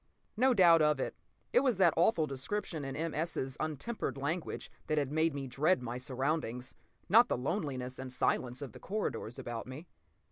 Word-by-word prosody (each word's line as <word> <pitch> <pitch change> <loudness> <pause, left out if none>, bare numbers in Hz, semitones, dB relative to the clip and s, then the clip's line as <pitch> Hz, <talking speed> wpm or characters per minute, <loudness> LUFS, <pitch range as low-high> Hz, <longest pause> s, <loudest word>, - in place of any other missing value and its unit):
No 255 +3 +4
doubt 170 -4 +7
of 150 -2 +3
it, - - -2 0.4
it - - +7
was 255 -7 +2
that 175 -4 +5
awful 170 -1 +3
description 150 +4 -3
in 135 0 -4
M. 165 0 -2
S.'s 150 -5 -2
untempered 155 - -3
language 155 +5 -3 0.2
that 155 - 0
had 140 -2 0
made 160 0 +2
me 140 -1 -3
dread 135 +3 +2
my 120 +1 -4
surroundings, 130 -1 -2 0.3
not 235 +6 +6
the - - +1
loneliness 130 -3 -3
and 130 -1 -5
silence 125 +1 0
of 135 - -7
the - - -12
corridors 195 - -3
about 120 0 -5
me. 135 +6 -8
150 Hz, 180 wpm, -33 LUFS, 130-170 Hz, 0.4 s, doubt